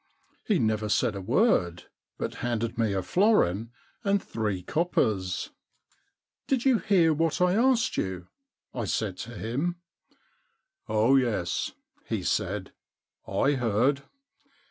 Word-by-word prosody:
He 210 - +2
never 110 -4 0
said 115 +1 +2
a 100 - -5
word, 90 - +2 0.3
but - - -3
handed 115 -1 -1
me 115 -2 +1
a 95 -1 -1
florin 115 - +2 0.3
and 200 -1 +2
three 105 - -3
coppers. 105 - 0 0.3
* - - -40
" - - -60
Did 265 -2 0
you 260 -4 +4
hear 175 -7 +3
what 160 +1 0
I 180 0 +3
asked 230 0 +2
you? 90 -2 -3 0.5
I 120 -4 -3
said 100 -1 -1
to 120 +2 -7
him. 140 +10 -2 0.4
* - - -41
" - - -42
Oh, 110 +5 +4
yes," 110 -9 -1 0.3
he - - -2
said, - - -1 0.3
" - - -65
I 140 - +2
heard. 130 +2 +1
120 Hz, 145 wpm, -27 LUFS, -, 0.5 s, you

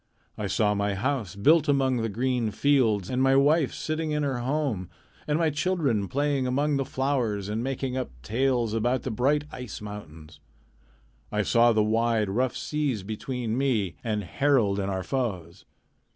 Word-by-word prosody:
I 105 - -3
saw 105 +1 +2
my 100 -1 -1
house 110 - -2
built 155 +9 +4
among 135 -3 +2
green 125 0 0
fields, 110 -6 +2
and 130 0 -1
my 135 0 +4
wife 145 +1 +4
sitting 155 0 -3
in 150 -1 0
her 135 -3 -1
home, 125 - -1 0.4
and 150 0 +1
my 160 -2 +2
children 145 - 0
playing 140 +1 0
among 140 +3 +1
the 135 - -1
flowers 125 -8 -1
and 110 +2 -2
making 135 -1 -3
up 130 - -2
tales 120 - 0
about 120 +3 0
the 130 - -3
bright 140 +6 +1
ice 125 -5 -7
mountains. 80 -7 -10 0.9
I 105 0 +1
saw 120 +2 +4
the 110 -1 +3
wide, 110 -1 +1
rough 125 +4 0
seas 145 -9 -2
between 115 +2 -3
me 120 -9 0
and 105 -2 -1
Harald 115 -3 +2
and 100 0 -1
our 95 -1 -2
foes. 95 - -3
125 Hz, 165 wpm, -26 LUFS, 105-140 Hz, 0.9 s, built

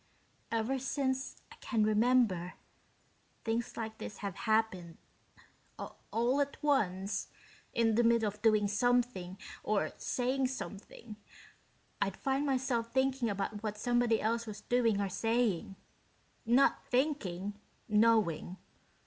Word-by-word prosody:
"Ever 230 +4 0
since 265 0 -2
I - - -13
can 225 -4 +1
remember, 215 -5 +2 0.9
things 225 +1 -2
like 220 -1 -5
this 205 - -7
have 200 -2 -4
happened 205 -7 0 0.8
all 245 +5 -1
at 280 0 -2
once, 200 -9 +1 0.5
in 225 -1 +3
the 230 - +4
middle 230 -1 +4
of 205 +1 -5
doing 215 -2 +4
something 205 -4 +1 0.2
or 200 -7 0
saying 260 +1 0
something, 220 -3 -8 0.8
I'd 195 -1 0
find 275 +2 0
myself 250 -4 0
thinking 265 -2 +1
about 200 +1 -3
what 210 -1 -3
somebody 240 0 +2
else 230 +1 -1
was 210 -1 -7
doing 230 -4 +2
or 200 - 0
saying. 215 -2 0 0.7
Not 250 +4 +4
thinking 205 - -1 0.3
knowing. 210 -5 +2
225 Hz, 115 wpm, -32 LUFS, 205-245 Hz, 0.9 s, the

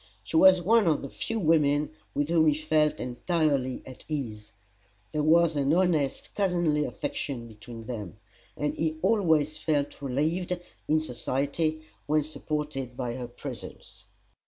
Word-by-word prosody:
She - - -6
was 185 +2 +7
one 220 +1 +4
of 155 -3 +2
the 140 - -5
few 225 - -3
women 150 -4 +3 0.2
with 145 +1 0
whom 165 -2 +4
he 150 - +4
felt 155 0 +2
entirely 135 0 0
at 130 - -11
ease. 115 -9 -4 0.6
There 150 - 0
was 165 +1 +4
an 140 -1 +2
honest, 165 -7 +1
cousinly 175 -6 +1
affection 125 -5 -4
between 115 +1 -10
them; 105 -8 -6 0.4
and 150 - 0
he 160 -1 -1
always 160 -8 +2
felt 145 -3 -1
relieved, 160 +7 -1 0.3
in 155 +1 +3
society, 150 +4 -1 0.2
when 155 0 +3
supported 150 -4 -4
by 125 -2 -2
her 125 -1 -5
presence. 120 - -9
150 Hz, 140 wpm, -28 LUFS, 135-160 Hz, 0.6 s, was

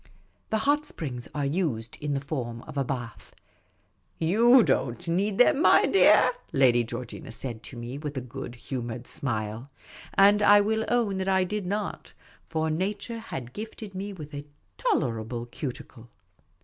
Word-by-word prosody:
The 220 - +1
hot 295 +1 +2
springs 125 - -5
are 145 -1 0
used 140 -8 -1
in 145 -1 -1
the - - 0
form 125 -5 -5
of - - -10
a 140 - +1
bath. 120 -4 -6 0.4
" - - -42 0.2
You 240 +2 +7
don't 135 - 0
need 195 +4 0
them, 280 +4 +5
my - - +6
dear," 390 - +6 0.2
Lady 125 -3 +4
Georgina 120 +1 -7
said 115 -1 -6
to 125 - -9
me, 120 +4 -6
with 145 -2 -5
a - - -1
good 125 0 -7
humoured 120 -1 -5
smile; 110 -1 -3 0.5
and 205 +1 +6
I 205 0 +7
will 220 +2 +1
own 220 -6 +1
that 190 0 -1
I 190 -1 +3
did 200 0 -3
not, 205 +1 -4 0.4
for 160 -1 0
nature 200 +7 -2
had 125 - -7
gifted 215 -1 -7
me 195 +2 -4
with 155 -6 -9
a 145 +1 -7 0.3
tolerable 120 - -1
cuticle. 120 -2 -7
145 Hz, 160 wpm, -27 LUFS, 120-205 Hz, 0.5 s, You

